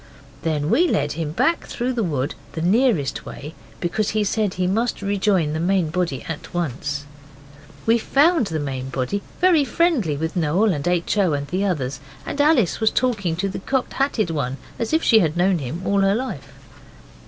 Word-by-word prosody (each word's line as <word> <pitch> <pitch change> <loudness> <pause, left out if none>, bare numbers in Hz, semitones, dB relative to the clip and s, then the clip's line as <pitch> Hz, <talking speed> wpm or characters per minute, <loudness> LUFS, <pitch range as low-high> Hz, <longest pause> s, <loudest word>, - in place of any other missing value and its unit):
Then 155 -2 -1
we 350 +3 +4
led 145 - 0
him 155 -1 -3
back 260 - +1
through 250 +2 -2
the 240 - -1
wood 145 -7 -1 0.2
the 160 - -4
nearest 200 - +2
way, 150 +3 -8 0.3
because 195 +4 -1
he 215 - +3
said 205 -1 0
he 185 0 0
must 220 +4 0
rejoin 195 -6 +1
the 155 - -2
main 175 -2 +1
body 170 -6 -1
at 160 +1 -7
once. 145 -3 -2 0.8
We 230 +1 +4
found 285 - +3
the 160 - -2
main 135 -2 -4
body 135 +10 -2 0.2
very 355 -5 +5
friendly 275 - +1
with 160 +2 -3
Noel 180 +5 +2
and 145 +1 -3
H. 175 +3 +1
O. 185 -6 +3
and 140 0 -2
the 185 +4 0
others, 135 -8 -2 0.3
and 285 - -1
Alice 290 - +3
was 220 -1 +4
talking 215 -11 0
to 190 +4 -1
the 195 - -4
Cocked 260 +6 -1
Hatted 240 -10 0
One 135 -4 -2 0.2
as 230 - -2
if 320 +1 +2
she 225 - +6
had 165 -4 0
known 180 0 +3
him 155 +7 -5
all 200 0 +2
her 195 +1 +3
life. 215 - -5
185 Hz, 190 wpm, -22 LUFS, 155-225 Hz, 0.8 s, she